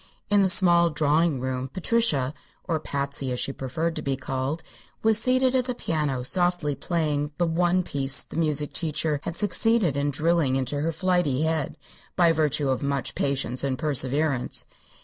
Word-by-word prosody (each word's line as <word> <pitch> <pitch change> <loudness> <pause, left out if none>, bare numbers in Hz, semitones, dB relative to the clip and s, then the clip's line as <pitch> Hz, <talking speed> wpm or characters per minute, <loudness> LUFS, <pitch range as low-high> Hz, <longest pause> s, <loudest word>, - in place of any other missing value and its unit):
In 205 -1 +5
the 190 - +3
small 175 -2 +4
drawing 150 -1 +1
room 130 0 -3
Patricia 180 - +1 0.3
or 165 -4 -1
Patsy, 140 -2 -3
as 125 - -2
she 135 - -2
preferred 155 +6 -3
to - - -3
be 135 -2 -1
called 135 +4 -3 0.4
was 220 -1 +4
seated 255 +2 +2
at 255 -2 +2
the 250 -1 -3
piano 150 - -2
softly 175 0 +1
playing 150 -2 -2
the 175 - +2
one 175 +2 +1
"piece" 135 -4 +1
the - - -12
music 150 -3 0
teacher 155 -2 0
had 165 - -4
succeeded 210 - +1
in 140 +1 0
drilling 155 -1 +1
into 135 +2 -2
her 165 +2 0
flighty 165 -5 0
head 160 -2 -1 0.4
by 170 -2 +4
virtue 150 -3 +1
of 130 - 0
much 140 -2 -2
patience 140 -2 -1
and 135 -2 -1
perseverance. 140 -2 0
150 Hz, 170 wpm, -25 LUFS, 140-175 Hz, 0.4 s, In